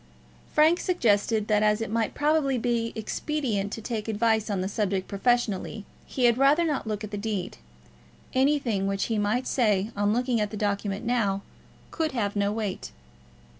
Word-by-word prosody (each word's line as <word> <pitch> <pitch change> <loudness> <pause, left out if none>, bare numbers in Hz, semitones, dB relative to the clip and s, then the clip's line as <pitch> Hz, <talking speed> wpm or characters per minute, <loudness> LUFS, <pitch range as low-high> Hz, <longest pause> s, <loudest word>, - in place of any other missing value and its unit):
Frank 320 +3 +4
suggested 220 - +1
that, 210 -1 +3
as 210 0 +3
it 225 -2 -4
might 225 -1 -1
probably 295 -3 +2
be 235 -1 0
expedient 220 -3 -2
to 225 - -6
take 220 -2 -3
advice 220 0 +1
on 200 -3 -1
the 185 - -1
subject 195 -2 -1
professionally, 215 -1 0 0.2
he 255 - 0
had 240 +1 +4
rather 285 +5 +5
not 300 -8 -1
look 210 -1 -3
at 210 - -6
the 205 - -4
deed. 205 -4 -3 0.8
Anything 260 -7 +1
which 195 0 -1
he 215 - +1
might 215 +5 0
say, 215 -4 +1
on 205 0 +1
looking 245 0 +1
at 210 - 0
the 215 - -6
document 205 +1 -2
now, 205 -5 0 0.5
could 315 -3 -1
have 205 -5 -1
no 200 0 +1
weight. 210 -3 -4
220 Hz, 170 wpm, -26 LUFS, 205-245 Hz, 0.8 s, rather